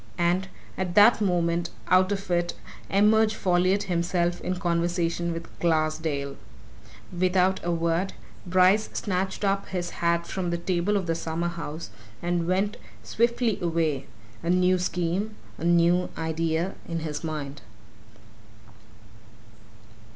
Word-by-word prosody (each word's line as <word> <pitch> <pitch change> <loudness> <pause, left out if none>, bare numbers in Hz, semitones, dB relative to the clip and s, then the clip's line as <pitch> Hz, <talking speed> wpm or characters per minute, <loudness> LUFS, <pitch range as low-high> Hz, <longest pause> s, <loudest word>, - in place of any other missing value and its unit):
And 175 +2 +1 0.3
at 180 -2 -2
that 215 +2 +7
moment 175 -3 +1 0.2
out 185 +1 +4
of 195 -1 -3
it 175 0 +1 0.3
emerge 215 +2 +4
Folliot 185 +1 +2
himself 175 -1 0
in 185 - -2
conversation 170 -1 0
with 165 0 -5
Glassdale! 155 -3 0 0.8
Without 185 +1 +2
a 175 - -2
word, 170 +2 0 0.3
Bryce 185 +3 +4
snatched 190 0 -2
up 195 0 +1
his 175 -2 -3
hat 170 0 +2
from 185 -1 -3
the 170 - 0
table 180 +3 0
of 190 - -2
the 165 - 0
summer 165 +1 -2
house, 165 -1 -6 0.3
and 175 -1 -1
went 195 +3 0 0.3
swiftly 235 - +1
away 160 -5 0 0.3
a 170 - -3
new 180 +1 +3
scheme, 180 +4 -1 0.2
a - - -6
new 175 +1 +3
idea 165 +2 -1 0.2
in 165 -1 -2
his 150 -1 -4
mind. 145 -3 -5
175 Hz, 125 wpm, -26 LUFS, 170-190 Hz, 0.8 s, that